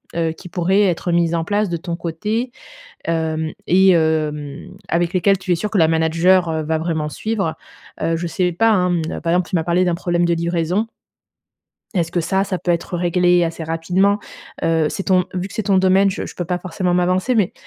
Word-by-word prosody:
heu, 165 -1 0
qui 180 +3 -11
pourraient 185 +4 +2
être 175 -2 0
mises 170 -1 +2
en 165 - 0
place 205 +3 0
de 170 - -2
ton 170 +1 -4
côté, 210 +9 -3 0.5
hem, 160 -1 -1 0.2
et 190 +2 +5
hem, 155 -2 0 0.2
avec 170 0 0
lesquelles 190 +1 +3
tu 185 - -3
es - - +4
sûr 210 +5 -3
que 210 - +1
la 160 - +5
manager, 165 +3 +3
heu, 160 -1 -1
va 160 +1 0
vraiment 160 -2 -2
suivre? 200 -2 -2 0.5
Heu, 165 - +1
je 170 +1 -3
sais 180 +2 0
pas, 225 +7 +3
hein, 180 -4 +2
mmh, 165 -2 -2
par 165 0 0
exemple, 180 -1 +1
tu - - -2
m'as 160 - 0
parlé 175 +1 +2
d'un 175 -1 +1
problème 175 0 0
de 170 0 +2
livraison 170 +5 -1 1.1
est-ce 170 -3 0
que 175 - +1
ça, 190 +4 0
ça 190 -2 -3
peut 175 - -2
être 170 +1 -3
réglé 175 0 +3
assez 165 0 -4
rapidement? 180 +5 +1 0.4
Heu, 160 -2 +2
c'est 195 - -4
ton 185 -2 +3
vu 185 +1 -3
que - - -12
c'est 220 - -1
ton 195 -1 +3
domaine, 190 +1 +4
je - - -4
je - - -10
peux 175 - -3
pas 180 +2 -2
forcément 180 0 -2
m'avancer, 185 +7 +1
mais 210 -6 +2
175 Hz, 215 wpm, -19 LUFS, 165-185 Hz, 1.1 s, et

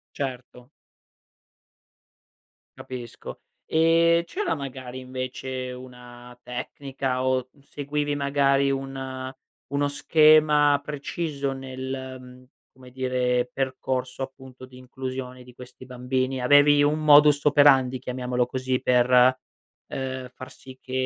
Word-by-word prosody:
Certo. 125 -2 -6 2.1
Capisco. 125 -2 -9 0.3
E 165 +1 +3
c'era, 405 - -2
magari, 130 -2 -7
invece, 130 0 -5
una 125 -1 -12
tecnica 130 +1 -4
o 130 -1 0
seguivi, 145 +1 -3
magari, 140 -1 +2
un 135 -1 -5 0.3
uno 145 +1 -1
schema 150 -1 +4
preciso 145 -1 -4
nel, 130 0 -6
mhmm, 125 0 -14 0.3
come 130 -1 -16
dire, 125 -1 -1
percorso, 130 -1 -3
appunto, 130 -1 -10
di 130 0 -17
inclusione 130 0 -7
di 125 -1 -16
questi 125 +1 -13
bambini? 130 +1 -2
Avevi 145 +2 +5
un 150 +2 +2
modus 150 -1 +6
operandi, 135 -3 +4
chiamiamolo 125 -1 -2
così, 130 +1 -3
per, 125 +1 +4 0.5
uhm, 130 -1 -5
far 130 - -10
sì 130 0 -14
che 130 - -12
130 Hz, 105 wpm, -25 LUFS, 125-140 Hz, 2.1 s, modus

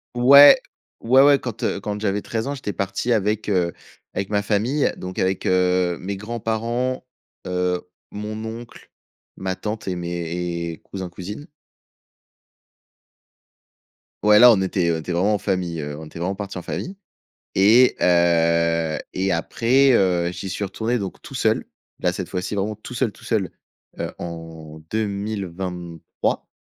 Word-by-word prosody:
Ouais, 140 +4 +9 0.4
ouais, 130 +4 +5
ouais, 140 -1 +6
quand, 120 -3 -6
heu, - - 0
quand 105 -1 -4
j'avais 105 -1 -1
13 110 +1 -3
ans, 140 - -2
j'étais 125 -7 -4
parti 100 +5 -2
avec, 105 -1 0
heu, 90 -4 +1 0.4
avec 95 - -3
ma 105 -1 0
famille 115 +8 +1
donc 90 0 -8
avec, 95 0 0
heu, 90 -1 +2
mes 100 +2 -4
grands-parents, 115 +4 -2 0.4
heu, 90 0 0 0.3
mon 105 +1 -5
oncle, 115 +2 -9 0.5
ma 95 0 -3
tante 105 +1 -5
et 90 - -1
mes 85 0 -3
et - - -22
cousins, 95 -2 -6
cousines. 105 - -8 2.8
Ouais 105 0 +6
là, 125 +1 +10
on 100 - +1
était 90 -2 0
on 80 - -2
était 85 - -5
vraiment 95 +5 +2
en 105 - +2
famille, 90 -5 -2
heu, 75 0 -5
on 80 - -8
était 75 - -11
vraiment 90 +3 -1
parti 100 -1 -6
en - - -4
famille 180 - -5 0.6
et 115 +6 +5
heu 85 -2 +3 0.2
et 95 0 0
après, 125 +10 +3
heu, 90 -4 +2
j'y 95 +2 -6
suis 100 - -3
retourné, 110 +5 -1
donc 100 -4 -6
tout - - -10
seul, - - +1 0.4
là, 90 - +1
cette 90 0 -5
fois-ci 90 +2 -3
vraiment 100 +2 -1
tout 110 +4 -10
seul, 120 -3 0
tout - - -19
seul, 105 -6 -1 0.5
heu, - - -3
en 80 -2 -8
2023. 95 -5 -3
95 Hz, 155 wpm, -22 LUFS, 90-110 Hz, 2.8 s, là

